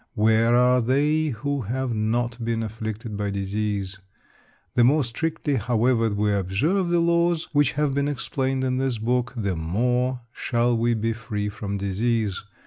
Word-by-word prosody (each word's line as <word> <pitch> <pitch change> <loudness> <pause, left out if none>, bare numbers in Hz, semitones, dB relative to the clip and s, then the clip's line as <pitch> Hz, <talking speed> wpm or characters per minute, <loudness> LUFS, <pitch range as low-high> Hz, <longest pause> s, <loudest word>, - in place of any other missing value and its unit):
Where 110 +2 +3
are 125 +1 +4
they 150 +6 +2
who 140 +2 -2
have 125 +3 -2
not 115 +2 -1
been 115 0 -1
afflicted 110 0 -5
by 100 0 -2
disease? 100 0 -2 0.7
The 120 - +4
more 145 +5 +4
strictly, 145 +3 -2
however, 115 +1 +2
we 105 0 0
observe 120 - 0
the 175 - +2
laws 170 0 +2
which 145 -2 +3
have 150 -1 0
been 140 +1 0
explained 135 -1 -2
in 130 0 0
this 130 -3 0
book, 125 +2 0
the 100 -5 -1
more 125 +10 0
shall 120 0 0
we 115 +1 +1
be 115 +1 -1
free 110 -2 -4
from 100 -1 -4
disease. 105 +1 -1
120 Hz, 155 wpm, -24 LUFS, 105-130 Hz, 0.7 s, are